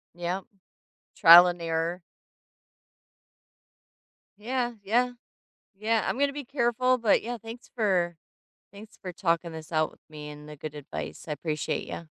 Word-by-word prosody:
Yep. 175 +2 -3 0.7
Trial 175 +2 +10
and 175 -1 -3
error. 165 +2 -1 2.4
Yeah, 240 +2 -2
yeah. 245 +5 +2 0.6
Yeah, 220 +2 +1
I'm - - -1
gonna 285 0 +3
be 285 -3 -6
careful, 255 -1 +1
but, 230 -3 +3
yeah, 240 +1 -4
thanks 225 +3 -10
for 185 -7 +1 0.6
thanks 210 +2 -13
for 180 -2 -6
talking 170 -2 0
this 160 +1 -9
out 155 -1 +1
with - - -22
me 150 -1 -8
and 150 0 -11
the 150 - -10
good 150 +1 -6
advicem 150 +2 -7
I - - -2
appreciate 155 +1 -3
ya. 170 - -6
180 Hz, 145 wpm, -27 LUFS, 165-235 Hz, 2.4 s, Trial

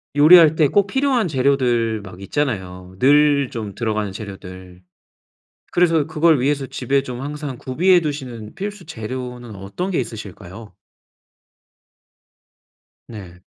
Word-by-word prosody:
요리할 160 +1 +7
때 155 -2 +4
꼭 200 +7 +2
필요한 260 -3 +1
재료들 125 -6 +1
막 95 -1 -12
있잖아요. 95 -8 -4
늘 145 0 +4
좀 105 -4 -6
들어가는 110 -3 -2
재료들. 95 -3 -10 0.9
그래서 165 -4 +2
그걸 160 -1 +3
위해서 140 +1 0
집에 135 0 -1
좀 125 0 -7
항상 145 -2 -6
구비해 175 +10 +3
두시는 130 -8 -6
필수 205 -2 -6
재료는 125 -1 -7
어떤 100 - -5
게 170 - 0
있으실까요? 105 -3 -8 2.3
네. 95 -6 -11
130 Hz, 255 characters per minute, -20 LUFS, 105-150 Hz, 2.3 s, 요리할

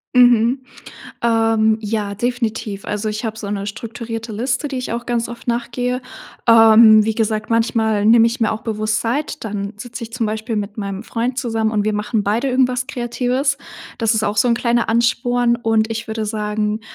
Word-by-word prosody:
Mhm, 245 +1 +4 0.6
ähm, 225 -1 +3
ja 210 -1 -2
definitiv. 225 -3 -3
Also, 210 +1 -2
ich 215 +3 -4
habe 220 0 -5
so 205 -2 -5
'ne 200 -1 -3
strukturierte 225 +1 -6
Liste, 250 +6 -1
die 270 -2 -4
ich 255 - -5
auch 235 +1 -3
ganz 240 -1 -1
oft 235 0 -10
nach 235 0 -1
gehe. 250 0 -2 0.5
Ähm, 220 -1 +8
wie 220 0 -1
gesagt, 220 -1 -1
manchmal 225 -2 +1
nehme 230 +1 +6
ich 235 +2 -2
mir 225 - +2
auch 220 0 -4
bewusst 215 0 -1
Zeit, 285 +5 -2
dann 205 -1 -4
sitze 240 +3 -8
ich 230 0 -7
zum 245 -2 -1
Beispiel 220 +1 -3
mit 210 +1 -4
meinem 200 -1 -4
Freund 240 +2 -3
zusammen 225 -3 0
und 210 -2 0
wir 215 - +1
machen 210 +1 -1
beide 220 +7 0
irgendwas 255 -1 +1
Kreatives. 255 +2 -1 0.4
Das 225 -1 +2
ist 220 - 0
auch 210 -1 -1
so 245 - +4
'n 235 - +4
kleiner 235 0 0
Ansporn, 235 +1 +2
und 225 -1 +1
ich 225 +1 -4
würde 220 0 -3
sagen, 210 0 -2
225 Hz, 190 wpm, -19 LUFS, 215-240 Hz, 0.6 s, Ähm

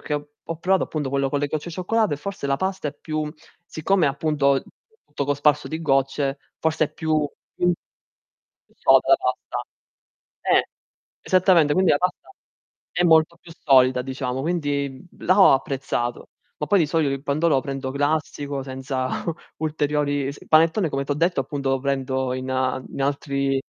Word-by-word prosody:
che 150 - -3
ho 145 +2 -6
provato 190 +2 +2
appunto 145 -4 -3
quello 140 -1 +1
con 145 +1 -1
le 145 - +1
gocce 155 +3 -4
di 170 - -7
cioccolato, 205 0 +1
e - - -6
forse 170 -1 -5
la 135 - +1
pasta 190 -1 -2
è - - -8
più 155 -1 -3 0.4
siccome 170 +2 +1
è - - +4
appunto 140 -1 +1 0.4
tutto 145 -1 -4
cosparso 145 +1 +2
di 160 +1 -4
gocce 135 -1 +1 0.2
forse 160 0 +1
è - - -18
più 155 -2 0 0.3
più 180 - +2 1.0
più - - -31
soda - - +4
la - - +8
pasta. - - -3 0.8
Eh, - - +3 0.5
esattamente, 180 -5 +4
quindi 185 -2 +4
la - - +4
pasta 180 - -2 0.6
è 175 - +1
molto 160 0 +4
più 170 - -13
solida 130 -3 +4
diciamo, 130 0 -3
quindi, 145 -4 -1 0.2
mhmm, - - -14
là 185 +3 +5
ho - - +8
apprezzato. 130 -3 -2 0.3
Ma 150 - -2
poi 195 +6 +4
di 160 - +3
solito 150 -1 +1
il 135 0 -4
pandoro 150 +3 +1
lo - - +2
prendo 135 -1 -4
classico, 145 -1 -1
senza 130 -1 -3 0.5
ulteriori 150 -2 0
il 140 +2 -6
panettone 165 +4 +4
come 140 0 -2
ti - - -8
ho - - -1
detto 165 0 +1
appunto 140 0 -2
lo 135 0 +1
prendo 130 -1 -1
in 130 0 -4
a 130 0 0
in - - -7
altri 140 -1 0
145 Hz, 175 wpm, -23 LUFS, 135-160 Hz, 1.0 s, la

